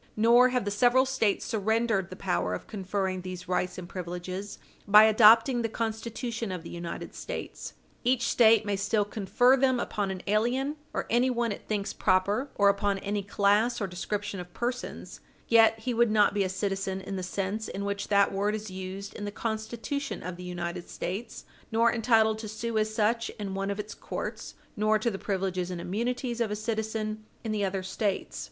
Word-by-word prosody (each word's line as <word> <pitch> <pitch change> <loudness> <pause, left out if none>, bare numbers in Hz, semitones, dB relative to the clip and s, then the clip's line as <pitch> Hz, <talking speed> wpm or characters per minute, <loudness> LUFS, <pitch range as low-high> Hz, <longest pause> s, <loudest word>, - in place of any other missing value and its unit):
Nor 235 +3 +6
have 250 -3 0
the 205 - -1
several 245 +5 +4
States 255 -6 0
surrendered 220 -3 0
the 185 - -8
power 90 - -1
of - - -8
conferring 190 -2 -2
these 185 0 -7
rights 180 0 -1
and 180 -1 -7
privileges 185 +2 -6 0.3
by 210 +1 +9
adopting 225 +3 +6
the 225 - -1
Constitution 230 0 -3
of 180 -3 -5
the - - -9
United 170 -1 -6
States. - - -6 0.3
Each 245 -1 +2
State 225 -2 +5
may 205 -1 0
still 205 +1 +1
confer 225 +5 +3
them 260 -2 +2
upon 205 -4 -2
an 190 -1 -5
alien, 245 +8 +1
or - - -2
anyone 240 -1 +2
it 200 - -7
thinks 205 -1 -2
proper, 200 +8 +1
or 200 - +4
upon 200 0 +2
any 200 +1 -2
class 205 +4 +2
or 205 - -1
description 195 +2 -4
of 180 0 -8
persons, 245 +1 -4 0.3
yet 225 -1 +6
he 245 +2 -1
would 235 0 +3
not 210 -1 +4
be 205 -1 +1
a 185 - -1
citizen 195 0 -2
in 195 +1 -6
the 185 - -3
sense 195 +4 -3
in 200 +1 -4
which 200 0 -3
that 200 -1 +4
word 205 +2 0
is 215 -2 -6
used 190 +1 -6
in 205 - -6
the 205 - -4
Constitution 230 +6 -4
of 180 -1 -5
the 180 - -10
United 175 -1 -5
States, 200 +7 -5 0.3
nor 230 +1 +3
entitled 220 -2 +3
to 220 - -6
sue 220 +2 -4
as 215 0 0
such 225 +1 +1
in 200 -3 -4
one 195 +1 -2
of 200 +1 -3
its 210 +1 -5
courts, - - -6 0.2
nor 215 +1 +3
to 230 +2 0
the 195 - -5
privileges 185 -2 -2
and 180 -1 -4
immunities 240 +6 -2
of 225 - +1
a 210 - -2
citizen 215 0 -3 0.2
in 225 - -3
the 210 -1 0
other 190 -1 -1
States. 195 +1 -2
210 Hz, 190 wpm, -28 LUFS, 195-230 Hz, 0.3 s, by